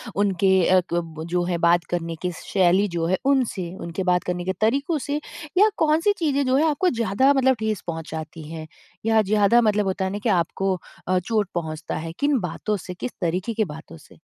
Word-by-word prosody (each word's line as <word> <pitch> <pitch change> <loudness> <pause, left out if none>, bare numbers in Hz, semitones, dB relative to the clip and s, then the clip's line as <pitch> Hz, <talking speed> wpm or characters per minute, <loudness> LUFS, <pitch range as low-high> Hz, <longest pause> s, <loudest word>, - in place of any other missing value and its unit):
उनके 195 -1 +2 0.2
अ, 185 0 +5
क 165 -2 -3
जो 175 0 +1
है 175 -1 -1
बात 170 +1 +3
करने 165 -1 -2
की 180 -1 -1
शैली 190 +2 +2
जो 170 -2 -2
है 185 +2 +2
उनसे, 245 -10 +1
उनके 170 0 -5
बात 180 -1 +2
करने 180 0 -3
के 190 - 0
तरीक़ों 275 +8 +1
से 290 +1 -1 0.4
या 420 +3 +6
कौन 310 0 +3
सी 410 +4 +3
चीज़ें 285 -4 +1
जो 255 0 +2
हैं 300 - +3
आपको 335 +5 +1
ज़्यादा 235 - +2
मतलब 265 -1 +3
ठेस 220 -3 -1
पहुँचाती 160 -1 -6
हैं 160 -1 -7 0.4
या 225 -1 +4
ज़्यादा 210 +3 +4
मतलब 210 -2 +2
होता 190 0 -1
है 190 - -2
ना 205 - -3
कि 235 - +1
आपको 190 +1 +1 0.3
अ, 185 0 +2
चोट 205 +1 -1
पहुँचता 160 -1 -4
है 165 +1 -5
किन 285 -2 +2
बातों 205 +3 -2
से, 180 -1 -8
किस 245 +7 -5
तरीक़े 180 +6 -1
की 220 - +1
बातों 150 - -10
से? - - -18
190 Hz, 210 wpm, -23 LUFS, 175-235 Hz, 0.4 s, या